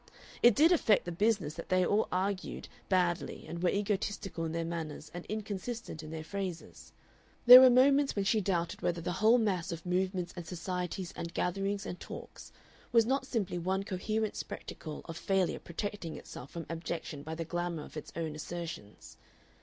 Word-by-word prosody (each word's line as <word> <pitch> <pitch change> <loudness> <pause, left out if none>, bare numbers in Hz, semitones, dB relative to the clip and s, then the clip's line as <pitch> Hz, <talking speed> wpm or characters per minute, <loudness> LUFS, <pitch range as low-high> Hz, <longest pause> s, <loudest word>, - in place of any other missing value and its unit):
It 240 -3 +7
did 320 +4 +6
affect 225 - +4
the 175 - -3
business 200 -4 +1
that 170 - -8
they 185 0 +3
all 205 +4 +2
argued 190 +1 -2 0.2
badly 180 -3 0
and 170 0 -5
were 180 - +3
egotistical 200 -4 -2
in 160 - -3
their 165 0 -2
manners 160 -2 -5
and 175 0 -7
inconsistent 215 -3 -4
in 155 - -9
their 160 0 -5
phrases. 185 0 -6 0.5
There 250 +1 +13
were 260 - +9
moments 275 +3 +5
when 200 -1 0
she 215 +2 +3
doubted 175 -3 -1
whether 170 -1 0
the 175 +2 -3
whole 215 +6 +5
mass 195 -8 0
of 165 -1 -6
movements 180 0 -1
and 175 -2 -7
societies 180 +1 -4
and 170 0 -6
gatherings 195 +3 -1
and 180 - -5
talks - - -9 0.4
was 230 -2 +5
not 265 +2 0
simply 195 -8 -1
one 190 +3 0
coherent 215 +3 -2
spectacle 155 -2 -7
of 165 - -7
failure 190 +1 +1
protecting 175 -1 -5
itself 130 - -9
from 170 -1 -6
abjection 165 -3 -5
by 160 +2 -5
the 165 0 -4
glamour 175 -1 -3
of - - -12
its 155 - -7
own 160 -2 -3
assertions. 150 - -7
180 Hz, 175 wpm, -32 LUFS, 165-205 Hz, 0.5 s, There